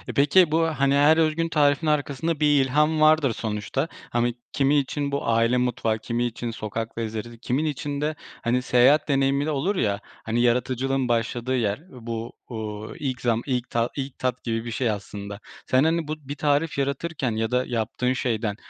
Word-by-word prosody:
Peki 150 +4 +5
bu, 160 +1 +3
hani, 140 -3 +1
her 145 +3 +5
özgün 165 +1 +1
tarifin 145 0 +2
arkasında 150 +1 0
bir 150 - +3
ilham 150 +4 +2
vardır 155 -5 +5
sonuçta. 110 - -2 0.2
Hani, 120 0 +1 0.2
kimi 140 +1 +3
için 140 +1 -2
bu 140 - -2
aile 115 +2 +3
mutfağı, 115 -3 0
kimi 115 +2 -2
için 120 0 -4
sokak 115 +1 -5
lezzetleri 115 +1 -5
kimin 130 +6 -1
için 145 -1 -3
de, 155 +1 -1 0.3
hani, 125 +2 +1
seyahat 130 +4 +4
deneyimi 140 0 +2
de 155 - -1
olur, 155 +8 0
ya, 100 - 0 0.3
hani, 115 +2 0
yaratıcılığın 130 +2 +1
başladığı 120 +2 0
yer 105 -2 0
bu, 115 -2 -6 0.2
uuu, 110 -2 -6
ilk 130 -4 -3
zam 115 -2 +1
ilk 125 -3 -2
ta 115 0 0
ilk 135 -1 -5
tat 130 -1 -2
gibi 115 -1 -2
bir 120 - -4
şey 120 +2 0
aslında. 100 0 -6 0.3
Sen, 130 +1 +4
hani, 165 0 +1
bu 155 - -2
bir 145 - -3
tarif 145 +1 +1
yaratırken 140 -1 -1
ya 110 0 -1
da 125 0 +1
yaptığın 120 +2 -1
şeyden 115 -5 -1
130 Hz, 180 wpm, -25 LUFS, 115-145 Hz, 0.3 s, Peki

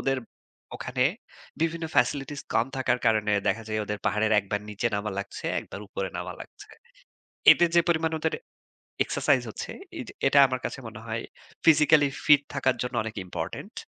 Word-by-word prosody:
ওদের 135 -1 0 0.6
ওখানে 125 0 -1 0.6
বিভিন্ন 165 0 -1
ফেসিলিটিস 135 +3 +1
কম 115 - +3
থাকার 125 -1 +1
কারণে 110 -2 +3 0.2
দেখা 115 - 0
যায় 110 0 -1
ওদের 105 0 -4
পাহাড়ের 110 +1 +1
একবার 100 +1 -3
নিচে 105 +3 -2
নামা 105 +1 -2
লাগছে, 100 - -6
একবার - - -9
উপরে - - -3
নামা - - -4
লাগছে। - - -15 0.8
এতে 175 - +7
যে - - +8
পরিমাণে 160 -1 +1
ওদের 160 0 0 0.7
এক্সারসাইজ - - +2
হচ্ছে, - - -6 0.3
এইযে 255 - -7 0.2
এটা 140 - +4
আমার 130 -1 -3
কাছে - - -4
মনে 110 0 -10
হয় 115 +1 -3 0.4
physically 150 -2 +6 0.2
fit 145 -2 +7
থাকার 130 -2 +1
জন্য 125 0 -4
অনেক 110 - -5
ইম্পোর্টেন্ট। 90 - -6
125 Hz, 160 wpm, -27 LUFS, 110-150 Hz, 0.8 s, যে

